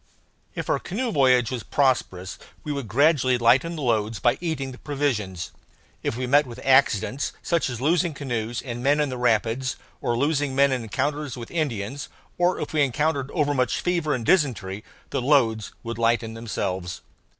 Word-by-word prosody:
If - - -4
our - - +1
canoe 230 +6 -3
voyage 130 -5 +3
was 125 -2 -3
prosperous 95 -11 0 0.2
we 150 - -4
would 140 -5 -3
gradually 130 - +3
lighten 130 +8 +3
the 155 - -5
loads 110 -2 0
by 120 - +2
eating 150 -6 -2
the 125 - -12
provisions. 105 - -2 0.5
If - - -2
we 130 - -2
met 145 +3 +4
with 120 - -9
accidents, 130 -1 +2
such 170 -5 +1
as 120 -2 -5
losing 160 +3 +1
canoes 120 -4 -3
and 120 -2 -5
men 145 +3 +3
in 150 -1 +1
the 130 - -4
rapids, 120 +2 +1 0.3
or 120 - 0
losing 145 0 0
men 140 0 +4
in 130 -2 0
encounters 140 +4 -2
with 115 -2 -8
Indians, 135 -5 -3 0.3
or 175 +1 +2
if - - -5
we 155 - +2
encountered 140 +1 0
overmuch 145 -5 +1
fever 170 -5 0
and 120 -3 -4
dysentery, 110 - +1 0.3
the 135 - -1
loads 120 -6 +2
would 115 -1 -5
lighten 115 -1 +1
themselves. 95 -6 -4
130 Hz, 170 wpm, -24 LUFS, 115-145 Hz, 0.5 s, met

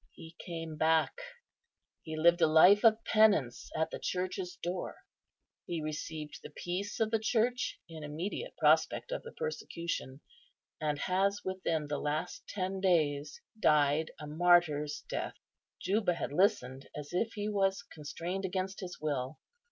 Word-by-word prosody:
He 165 +1 -12
came 165 -2 -6
back; 160 - +2 0.8
he 160 -1 -6
lived 170 +2 +5
a 160 - +6
life 180 +6 +7
of 225 -1 +5
penance 205 - +3
at 160 0 0
the - - -5
Church's 180 0 -3
door; 180 +1 -4 0.7
he 170 -2 -2
received 155 0 -5
the - - -9
peace 185 +4 -4
of 220 -1 +1
the 225 - +2
Church 240 +4 0
in 160 -2 -9
immediate 180 - -5
prospect - - +3
of - - -2
the 470 - -10
persecution, 170 - -4 0.6
and 150 -1 0
has 195 +5 +1
within 185 -5 -1
the 145 0 -3
last 150 +1 -3
ten 190 -1 -3
days 150 -6 +1 0.2
died 150 -3 +3
a 150 - -6
martyr's 155 -2 +3
death." - - -3 0.4
Juba 195 -1 +1
had 145 - -4
listened 140 - +1
as 150 +2 -7
if 225 +5 0
he 210 -1 -3
was 195 -1 +1
constrained 170 +3 -5
against 190 +1 -2
his 180 -3 -7
will. 145 -2 -2
175 Hz, 145 wpm, -32 LUFS, 155-195 Hz, 0.8 s, life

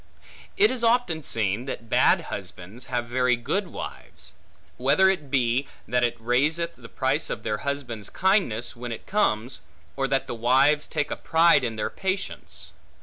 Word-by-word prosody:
It 420 +2 +5
is 250 -2 -4
often 230 -9 +2
seen 110 -3 -1
that 115 -4 -6
bad - - +4
husbands, 100 +8 -8
have 120 -1 -2
very 125 +1 +2
good 185 - -2
wives; - - -9 0.4
whether 140 +9 +4
it 175 -7 0
be, 130 0 +1 0.2
that 125 +2 +1
it 120 - 0
raiseth 145 +9 +1
the 120 -2 -13
price 95 - -1
of - - -4
their 105 0 -2
husband's 125 -7 -4
kindness, 185 - +1
when 120 0 -6
it 115 - -7
comes; 125 - 0 0.3
or 135 0 0
that 135 0 0
the - - -5
wives 135 +6 +3
take 150 -2 -2
a - - -1
pride 165 -3 +4
in 115 -2 -2
their 105 - -2
patience. 190 0 -4
130 Hz, 165 wpm, -25 LUFS, 120-165 Hz, 0.4 s, It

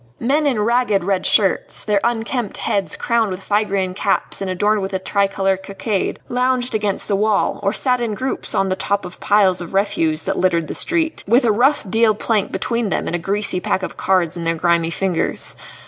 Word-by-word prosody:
Men 290 +5 +1
in 250 -6 +1
ragged 220 -4 +2
red 195 0 0
shirts, 195 -3 +2
their 210 -2 +1
unkempt 235 -1 -2
heads 200 -2 -2
crowned 235 -3 0
with 185 0 -6
Phrygian 200 -3 0
caps 195 +1 -1
adorned 200 +3 0
with 190 0 -4
a - - +2
tricolour 195 0 0
cockade, 195 +1 -3
lounged 250 0 0
against 210 -2 -1
the 200 - +1
wall, 210 +1 +1
or 200 0 +1
sat 250 +2 0
in 225 -3 -2
groups 260 +4 -3
on 195 - +1
the 185 - 0
top 200 +1 -1
of 180 - -10
piles 195 -3 +3
of 175 +2 -7
refuse 165 -6 +1
that - - -2
littered 170 -4 +1
the - - -5
street, 325 -2 0
with 240 +5 +4
a 225 - +4
rough 245 +2 +2
deal 220 +2 +3
plank 210 -1 0
between 235 -3 -1
them - - -1
and - - -2
a - - -2
greasy 195 +1 0
pack 185 +1 -1
of - - -5
cards 185 -4 +1
in 170 - -5
their 165 0 0
grimy 170 0 +1
fingers. 180 0 0
200 Hz, 200 wpm, -19 LUFS, 185-230 Hz, -, with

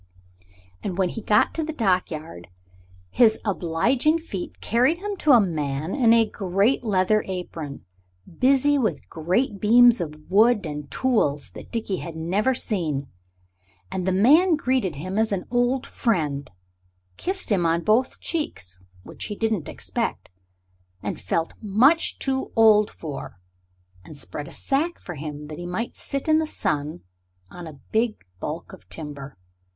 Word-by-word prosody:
And 185 -3 -4
when 190 -2 +2
he 225 - -6
got 210 - +3
to 325 - -2
the 315 - -3
dockyard 170 - -1 0.6
his 225 -3 +4
obliging 225 - +1
feet 210 - -7
carried 250 +9 +2
him 405 +2 -4
to 305 - +3
a 240 - +8
man 155 -4 -1
in 245 -5 +4
a 230 -1 +6
great 200 +5 0
leather 210 0 +2
apron, 170 -6 -6 0.5
busy 275 +2 +4
with 200 - -1
great 190 +7 0
beams 240 0 +6
of 155 -3 -4
wood 215 +2 +4
and 150 -2 -6
tools 145 - 0
that - - -11
Dickie 220 -5 -2
had 170 -2 -7
never 195 +11 0
seen. 155 - -1 0.8
And 185 -1 -3
the - - +3
man 300 - +5
greeted 255 - 0
him 185 +8 -3
as 220 -1 +1
an 195 -2 -2
old 245 +2 +1
friend, 150 - -1 0.7
kissed 375 - -3
him 190 -4 +3
on 165 +1 +1
both 230 +5 +2
cheeks 95 - -3 0.2
which - - -7
he 210 - -5
didn't 220 -7 -1
expect, - - -4 0.7
and 105 - -4
felt 165 - -1
much 240 +10 +3
too 265 -1 -1
old 215 -2 +6
for 145 - -8 0.6
and 145 - -11
spread 145 +1 -5
a - - -10
sack 310 +6 -1
for 175 - -8
him 150 -1 -7
that 155 - -7
he 175 - -6
might 220 +7 -3
sit 275 +1 -5
in 310 0 +5
the 315 - -1
sun 150 - -2 0.5
on 175 -2 -8
a 150 -3 -11
big 220 - 0
baulk 160 - -5
of 190 - -14
timber. 145 - -6
200 Hz, 155 wpm, -24 LUFS, 160-245 Hz, 0.8 s, a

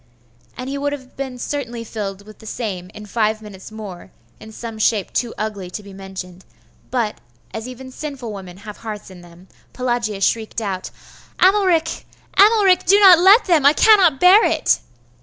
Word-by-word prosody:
And 250 - -6
he 280 +1 -4
would 285 0 -1
have 260 -3 -10
been 265 -2 -5
certainly 240 -3 -4
filled 200 -3 -6
with 215 0 -15
the 220 - -13
same 190 -6 -5
in 215 -1 -9
five 215 0 0
minutes 210 -2 -12
more, 205 -5 -9 0.3
in 220 - -12
some 225 0 -8
shape 215 -2 0
too 240 -2 -1
ugly 205 -4 -4
to 210 +3 -7
be 200 -1 -12
mentioned: 190 -1 -9 0.5
but, 235 -4 -2 0.3
as 220 +2 -6
even 260 +1 -10
sinful 260 -6 -7
women 185 -3 -10
have 210 -1 -8
hearts 215 -3 -8
in 180 -1 -13
them, 175 +1 -17 0.3
Pelagia 240 -5 -2
shrieked 220 +2 0
out 195 -4 -4 0.5
'Amalric! 370 -4 +2 0.3
Amalric! 405 -3 +5
do 400 +3 +6
not 375 -4 +8
let 390 +6 +6
them! 335 -6 +3
I 285 +2 +6
cannot 370 -8 +5
bear 375 +5 +7
it! - - +2
230 Hz, 175 wpm, -20 LUFS, 205-285 Hz, 0.5 s, not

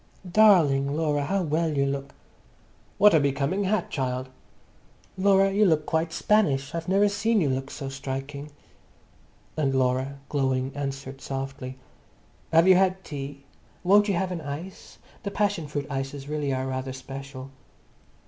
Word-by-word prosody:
"Darling 165 -9 +4
Laura, 150 -3 0
how 195 +5 0
well 160 -1 0
you 140 - +3
look!" 140 0 -4 0.8
"What 210 -1 +6
a 160 - +6
becoming 140 +7 0
hat, 195 -1 0
child!" 130 -2 -2 0.9
"Laura, 195 0 +4
you 205 +2 +3
look 160 -6 +3
quite 160 +1 0
Spanish. 145 -12 +1
I've 165 0 -4
never 200 +2 +4
seen 220 +2 +1
you 155 -7 +1
look 135 +1 -3
so 140 -2 -6
striking." 135 +2 -5 1.1
And 140 -4 0
Laura, 130 +1 0
glowing, 130 -2 0
answered 135 -1 -5
softly, 135 -1 -5 0.7
"Have 165 +2 +5
you 190 - +9
had 190 0 +2
tea? 140 -1 -7 0.4
Won't 205 +3 +5
you 200 - +1
have 185 +1 -1
an 175 -2 -4
ice? 155 +6 -8 0.2
The 200 - -3
passion 200 -5 -1
fruit 145 -1 -3
ices 135 0 -5
really 150 -2 -2
are 130 0 -1
rather 130 0 -3
special." 135 0 -8
145 Hz, 150 wpm, -26 LUFS, 135-185 Hz, 1.1 s, you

